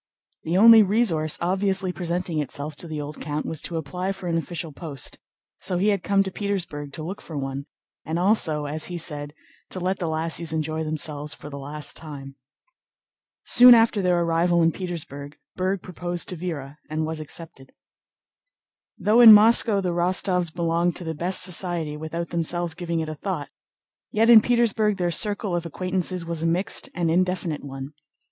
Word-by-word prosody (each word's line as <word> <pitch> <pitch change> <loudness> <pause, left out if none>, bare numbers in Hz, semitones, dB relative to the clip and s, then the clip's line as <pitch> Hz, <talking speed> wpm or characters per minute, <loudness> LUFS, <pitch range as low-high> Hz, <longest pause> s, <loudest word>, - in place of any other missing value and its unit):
The 165 +3 -1
only 225 +2 +9
resource 190 -7 +1
obviously 190 +1 0
presenting 175 -2 -3
itself 145 +1 -4
to 170 - -6
the 155 -2 -5
old 150 +1 -7
count 150 0 -3
was 160 -2 -4
to 170 - -4
apply 180 +5 -3
for 190 -1 -10
an 170 - 0
official 165 0 -4
post, 140 -3 -7 0.4
so 180 - -1
he 200 +4 +2
had 200 -3 +1
come 200 +1 +2
to 190 - -5
Petersburg 175 -8 -4
to 155 - -6
look 185 +5 -6
for 160 - -8
one 135 0 -4 0.4
and 160 +1 -3
also, 175 -6 +2
as 155 +2 -4
he 175 - -5
said, 150 -3 -3 0.3
to 185 - -4
let 185 +1 -1
the 175 - -2
lassies 160 +1 -1
enjoy 155 0 -2
themselves 150 -1 -3
for 150 - -11
the 140 - -7
last 145 +2 -5
time. 140 -3 -8 1.1
Soon 245 0 +8
after 225 -2 +3
their 180 -2 +2
arrival 170 +1 +2
in 165 - +4
Petersburg 150 -6 -6 0.2
Berg 185 0 -1
proposed 175 -1 -4
to 180 - -3
Véra 155 -5 -6
and 155 +1 -2
was 160 0 -4
accepted. 155 -3 -8 1.3
Though 220 +4 +4
in 230 -2 +11
Moscow 215 -1 +6
the 185 - -1
Rostóvs 180 0 0
belonged 170 0 0
to - - -4
the 160 -1 -3
best 175 +4 0
society 175 -4 -1
without 160 +2 -5
themselves 170 0 -1
giving 170 -1 -3
it 160 - -4
a - - -4
thought, 155 -2 -5 0.6
yet 225 +2 +3
in 225 -2 +10
Petersburg 220 -3 +1
their 175 -2 0
circle 205 +1 0
of 170 - -2
acquaintances 185 +1 -2
was 165 -1 -4
a 165 - 0
mixed 175 +4 0
and 170 -2 0
indefinite 180 -3 -1
one. 135 +1 -8
170 Hz, 180 wpm, -24 LUFS, 155-185 Hz, 1.3 s, in